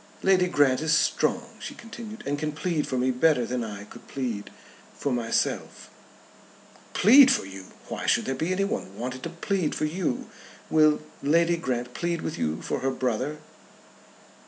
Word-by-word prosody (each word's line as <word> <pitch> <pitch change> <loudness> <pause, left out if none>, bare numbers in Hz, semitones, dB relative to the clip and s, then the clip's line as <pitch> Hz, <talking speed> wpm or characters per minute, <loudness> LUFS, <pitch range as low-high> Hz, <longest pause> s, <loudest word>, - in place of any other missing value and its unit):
"Lady 185 -1 +4
Grant 145 -6 +3
is 160 +1 +3
strong," - - 0
she - - -7
continued, 225 -1 -9
"and 145 +1 -1
can 150 0 -2
plead 160 0 -1
for 130 - -2
me 130 +1 +2
better 125 -1 +3
than 125 0 -2
I 105 -2 -6
could 105 - -14
plead 120 -7 -4 0.6
myself." 120 -4 -1 1.0
"Plead 260 +7 +8
for - - +2
you! 95 0 -9 0.2
Why - - -4
should - - +3
there 135 - -1
be 160 +6 -2
anyone 185 - -2
wanted 130 +1 -4
to 170 - -4
plead 170 0 -1
for 155 - 0
you? 160 -4 -2 0.4
Will 155 -1 +5 0.2
Lady 170 +4 +3
Grant 125 -6 -3
plead 170 -1 -2
with 160 - -4
you 80 0 -2
for - - -2
her 135 +1 0
brother?" 130 +3 -1
150 Hz, 160 wpm, -26 LUFS, 125-170 Hz, 1.0 s, Plead